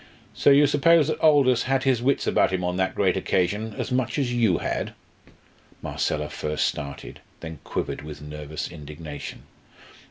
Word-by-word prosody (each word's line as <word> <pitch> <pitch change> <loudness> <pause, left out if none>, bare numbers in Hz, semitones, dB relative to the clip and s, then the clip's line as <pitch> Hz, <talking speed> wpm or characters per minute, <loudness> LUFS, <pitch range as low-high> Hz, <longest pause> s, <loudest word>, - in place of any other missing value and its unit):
"So - - +3
you 140 +1 +7
suppose 150 +2 +4
that - - -2
Aldous 140 -6 +4
had 135 0 +2
his 130 -3 +2
wits 135 +2 +1
about - - +2
him 95 -1 -1
on 90 0 -1
that 95 0 0
great 95 -3 +2
occasion 105 +3 -1
as - - -3
much 125 +1 0
as 130 -4 0
you 110 -8 +3
had?" - - -3 0.9
Marcella 75 0 -2
first 75 0 -1
started, 70 -1 -5 0.2
then 80 -3 -7
quivered - - -3
with 75 0 -9
nervous 75 +1 -6
indignation. 75 -1 -8
95 Hz, 160 wpm, -25 LUFS, -, 0.9 s, you